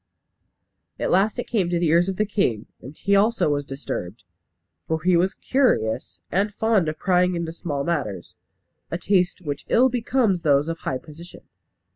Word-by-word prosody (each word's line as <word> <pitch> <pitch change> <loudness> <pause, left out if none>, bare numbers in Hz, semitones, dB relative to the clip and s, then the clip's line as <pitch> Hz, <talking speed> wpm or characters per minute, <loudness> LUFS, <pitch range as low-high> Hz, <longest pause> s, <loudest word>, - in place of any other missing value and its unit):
At - - -1
last 200 +5 +2
it 245 - -3
came 195 -7 0
to 175 - 0
the 170 -2 +1
ears 170 +3 +3
of 190 - -2
the 215 - +1
king, 195 - 0 0.2
and 135 +6 -11
he 200 0 +1
also 215 -3 +3
was 145 -1 0
disturbed. 125 -8 -6 0.6
For 160 0 0
he 180 0 +4
was 185 +4 +2
curious, 110 - 0
and 200 +3 +1
fond 210 -5 +1
of 155 - -5
prying 180 -1 +2
into 170 -1 -3
small 145 -5 -3
matters; 105 - -3 0.5
a 170 - -2
taste 180 0 +1
which 145 -3 -4
ill 255 +3 +5
becomes 235 -6 +1
those 145 -2 +3
of 165 0 -4
high 130 - -2
position. 160 +5 -13
175 Hz, 175 wpm, -23 LUFS, 145-200 Hz, 0.6 s, ill